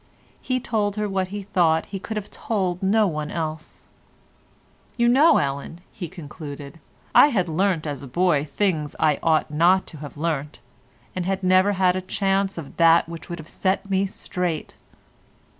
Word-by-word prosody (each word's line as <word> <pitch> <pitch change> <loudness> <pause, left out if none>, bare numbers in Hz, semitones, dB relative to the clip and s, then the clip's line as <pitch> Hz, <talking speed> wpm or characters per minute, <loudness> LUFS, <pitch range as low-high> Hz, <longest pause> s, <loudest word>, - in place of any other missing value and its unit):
He 255 -1 -1
told 210 -4 -1
her 210 -1 -1
what 190 -2 -1
he 200 +1 -6
thought 165 -4 +2
he 195 - -6
could 220 +3 -5
have 205 - -6
told 185 -5 -2
to 190 - -3
no 215 +2 +4
one 155 -5 -2
else. 155 -1 -5 1.1
"You 235 -1 +3
know, 275 +7 +6
Ellen," 140 +4 -3
he 175 -5 -7
concluded, 145 -1 -9 0.3
"I - - +8
had 200 -11 0
learnt 170 0 0
as 145 -3 -4
a 140 - -8
boy 170 +1 +2
things 155 0 -1
that - - -4
I 150 -2 +2
ought 160 -2 +2
not 175 +5 +3
to - - -9
have 145 0 -9
learnt, 150 -2 -3 0.6
and 180 -1 -2
had 195 0 -1
never 185 +2 +4
had 185 -1 +2
a 185 - -1
chance 195 +1 0
of 155 -4 -8
that 165 0 +5
which 165 0 -9
would 170 - -4
have 160 -2 -10
set 190 +2 -1
me 195 +1 +2
straight." 180 -4 -4
180 Hz, 180 wpm, -23 LUFS, 155-195 Hz, 1.1 s, I